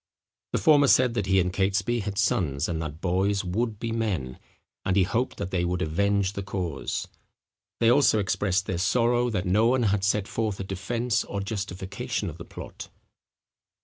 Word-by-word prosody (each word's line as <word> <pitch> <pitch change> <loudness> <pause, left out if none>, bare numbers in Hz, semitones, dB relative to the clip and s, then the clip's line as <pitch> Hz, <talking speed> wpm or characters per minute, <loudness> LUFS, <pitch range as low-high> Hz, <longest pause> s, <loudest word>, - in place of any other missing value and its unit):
The - - +3
former 145 -3 +5
said 125 -2 +4
that 105 -5 -1
he 95 0 +4
and 90 0 0
Catesby 100 +4 +1
had 100 -2 -4
sons, 85 -9 +1
and 80 -2 -2
that 80 +1 -6
boys 95 +2 +1
would 110 +4 -1
be 115 +2 -4
men, 95 - -2 0.4
and 95 - 0
he 100 - +5
hoped 115 +8 -1
that 100 -2 -4
they 90 -2 0
would 90 +1 -1
avenge 100 +4 +1
the 100 - -4
cause. 90 -7 -3 0.7
They 115 0 +5
also 125 -4 +5
expressed 95 -1 0
their 90 -2 -2
sorrow 120 +4 +2
that 95 -5 -2
no 105 +5 +3
one 125 0 +2
had 100 -2 +1
set 100 0 +1
forth 110 -3 -2
a - - -2
defence 100 +5 -1
or 100 - -5
justification 100 -2 -4
of - - -13
the - - -8
plot. - - -9
100 Hz, 180 wpm, -26 LUFS, 95-115 Hz, 0.7 s, former